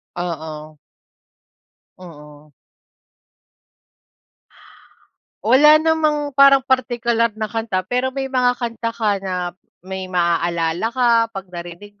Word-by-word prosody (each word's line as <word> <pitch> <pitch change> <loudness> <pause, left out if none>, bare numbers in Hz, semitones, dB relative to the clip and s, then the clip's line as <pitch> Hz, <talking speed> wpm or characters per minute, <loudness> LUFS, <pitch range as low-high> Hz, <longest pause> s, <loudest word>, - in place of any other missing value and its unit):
Oo. 155 -3 -6 1.2
Oo. 150 -4 -15 2.9
Wala 285 +7 +6
namang 310 -2 0
parang 275 0 +5
partikular 240 -3 +1
na 220 - -3
kanta, 215 -3 -3
pero 250 +6 -1
may 270 0 -5
mga 250 -1 +2
kanta 230 -1 -4
ka 220 -2 0
na 180 -2 -4 0.3
may 190 0 -6
maaalala 170 +1 0
ka 245 +1 0 0.3
'pag 190 -2 -8
narinig 175 +4 -10
215 Hz, 95 wpm, -19 LUFS, 175-255 Hz, 2.9 s, Wala